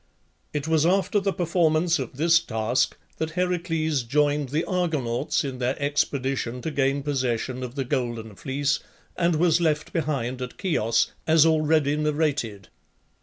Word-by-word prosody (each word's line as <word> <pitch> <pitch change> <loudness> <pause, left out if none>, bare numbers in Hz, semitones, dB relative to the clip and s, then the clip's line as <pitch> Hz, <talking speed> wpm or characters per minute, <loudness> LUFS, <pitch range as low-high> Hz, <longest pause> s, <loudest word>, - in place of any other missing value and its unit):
It 150 0 -3
was 160 -2 +3
after 195 +4 +2
the 195 0 0
performance 170 -2 +2
of 130 0 -6
this 170 +2 +5
task 115 -4 0 0.2
that 160 0 -3
Heracles 165 -5 0
joined 145 +3 +1
the 155 +5 0
Argonauts 155 -10 0
in 135 -3 -5
their 125 +1 -1
expedition 135 -3 -1
to 160 - -2
gain 140 -1 0
possession 130 -3 -1
of 125 0 -6
the 135 -2 -2
Golden 120 -4 -2
Fleece, 140 +7 -1 0.4
and 170 -1 +2
was 165 +1 +3
left 155 -2 0
behind 135 -6 -2
at 125 0 -6
Chios, 115 - +1 0.2
as 160 -1 +6
already 155 -2 +3
narrated. 145 - -1
145 Hz, 145 wpm, -25 LUFS, 130-160 Hz, 0.4 s, as